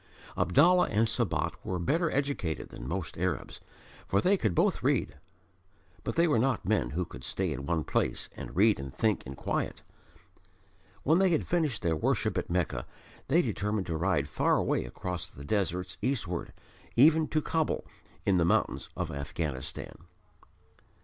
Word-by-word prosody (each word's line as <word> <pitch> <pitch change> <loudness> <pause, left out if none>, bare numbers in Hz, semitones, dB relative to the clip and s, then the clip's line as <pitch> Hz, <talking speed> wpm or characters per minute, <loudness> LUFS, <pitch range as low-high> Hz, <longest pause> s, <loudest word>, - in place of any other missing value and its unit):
Abdallah 170 - +5
and 110 +1 +2
Sabat 110 - 0
were 90 - -2
better 160 - +1
educated 135 - -2
than - - -8
most 85 0 -4
Arabs, 90 -5 -2 0.5
for 100 - +2
they 190 - +4
could 110 - 0
both - - +2
read. - - +1 0.9
But - - -3
they 170 +1 +4
were 130 -8 +3
not 130 0 +1
men 95 - +1
who 85 +7 -2
could 60 -6 -11
stay 90 +1 -1
in 70 0 -6
one 85 -2 +1
place - - -1
and - - -8
read 105 0 +4
and 70 -1 -6
think 110 - +1
in 65 - -6
quiet. - - -2 1.2
When 160 +5 +4
they 190 -1 +4
had 160 -3 +1
finished 155 - 0
their 85 -2 +2
worship 75 - 0
at - - -2
Mecca, 85 -9 -1 0.4
they 165 +6 +4
determined 105 -3 -1
to 85 - -2
ride 80 -4 +1
far 70 - +2
away - - 0
across 90 -2 -5
the 70 - -11
deserts 90 0 -1
eastward, 110 -10 -2 0.4
even 155 +5 +6
to 155 - +1
Kabul 160 +1 -1 0.4
in 95 -2 +4
the 85 - +4
mountains - - +1
of - - -2
Afghanistan. 70 -1 -4
95 Hz, 165 wpm, -30 LUFS, 80-135 Hz, 1.2 s, even